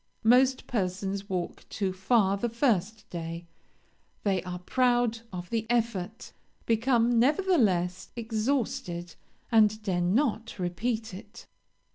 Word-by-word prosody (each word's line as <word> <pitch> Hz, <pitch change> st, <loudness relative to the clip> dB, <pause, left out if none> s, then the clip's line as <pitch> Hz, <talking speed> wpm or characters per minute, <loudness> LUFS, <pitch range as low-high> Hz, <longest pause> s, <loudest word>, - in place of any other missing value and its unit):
Most 255 Hz, +3 st, +4 dB
persons 195 Hz, -1 st, -2 dB
walk 180 Hz, -2 st, -3 dB
too 195 Hz, -3 st, -2 dB
far 195 Hz, +1 st, +2 dB
the 235 Hz, +4 st, -2 dB
first 220 Hz, -3 st, 0 dB
day; 170 Hz, 0 st, -5 dB, 0.8 s
they 195 Hz, -3 st, +1 dB
are 180 Hz, -1 st, -5 dB
proud 240 Hz, +3 st, +1 dB
of 175 Hz, -1 st, -7 dB
the 225 Hz, -1 st, -1 dB
effort, 225 Hz, -4 st, -1 dB, 0.3 s
become, 235 Hz, 0 st, +3 dB
nevertheless, 230 Hz, -, +2 dB
exhausted, 220 Hz, -7 st, -2 dB, 0.4 s
and 215 Hz, -2 st, +5 dB
dare 185 Hz, -4 st, 0 dB
not 225 Hz, +4 st, 0 dB
repeat 220 Hz, +5 st, -2 dB
it. 190 Hz, +4 st, -11 dB
215 Hz, 110 wpm, -28 LUFS, 185-235 Hz, 0.8 s, and